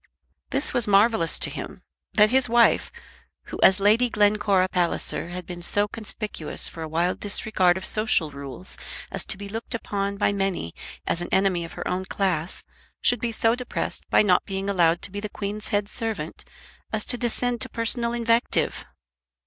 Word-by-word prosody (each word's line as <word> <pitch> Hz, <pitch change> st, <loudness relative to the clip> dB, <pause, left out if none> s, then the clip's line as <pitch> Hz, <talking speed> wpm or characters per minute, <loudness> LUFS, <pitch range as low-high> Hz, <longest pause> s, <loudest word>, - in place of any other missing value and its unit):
This 275 Hz, -, +1 dB
was 240 Hz, -3 st, +2 dB
marvellous 205 Hz, -3 st, +4 dB
to -, -, -1 dB
him, -, -, -7 dB, 0.3 s
that 215 Hz, 0 st, +6 dB
his 260 Hz, -1 st, +4 dB
wife, 235 Hz, 0 st, +4 dB, 0.5 s
who -, -, -8 dB
as 190 Hz, +1 st, +6 dB
Lady 220 Hz, +5 st, +4 dB
Glencora 205 Hz, -3 st, +3 dB
Palliser 175 Hz, -1 st, -1 dB
had 180 Hz, 0 st, -6 dB
been 175 Hz, -1 st, -8 dB
so 205 Hz, +4 st, +2 dB
conspicuous 210 Hz, -6 st, -3 dB
for 165 Hz, -, -9 dB
a 160 Hz, -, -4 dB
wild 170 Hz, +3 st, 0 dB
disregard 190 Hz, -3 st, +2 dB
of 190 Hz, -, -6 dB
social 215 Hz, -8 st, +1 dB
rules 140 Hz, -10 st, -4 dB, 0.3 s
as -, -, -2 dB
to -, -, 0 dB
be 200 Hz, 0 st, -7 dB
looked 225 Hz, +4 st, -4 dB
upon 200 Hz, -3 st, -3 dB
by 200 Hz, -, +2 dB
many 195 Hz, -, -2 dB, 0.3 s
as 170 Hz, -, 0 dB
an 175 Hz, -, -4 dB
enemy 190 Hz, -3 st, +2 dB
of 165 Hz, -, -10 dB
her -, -, -5 dB
own 185 Hz, +1 st, -2 dB
class, 185 Hz, -4 st, -1 dB, 0.4 s
should 245 Hz, -, +2 dB
be 235 Hz, -, -2 dB
so 225 Hz, 0 st, +2 dB
depressed 250 Hz, 0 st, -4 dB
by -, -, +5 dB
not 185 Hz, -4 st, +3 dB
being 195 Hz, 0 st, -3 dB
allowed 170 Hz, -3 st, +2 dB
to -, -, +1 dB
be 200 Hz, -, -5 dB
the 210 Hz, +1 st, -5 dB
Queen's 205 Hz, +1 st, -5 dB
head 205 Hz, -2 st, 0 dB
servant 225 Hz, 0 st, -4 dB, 0.5 s
as 220 Hz, -1 st, 0 dB
to 250 Hz, -, 0 dB
descend 245 Hz, 0 st, 0 dB
to -, -, +1 dB
personal 235 Hz, 0 st, 0 dB
invective! 235 Hz, 0 st, +1 dB
205 Hz, 180 wpm, -24 LUFS, 180-225 Hz, 0.5 s, that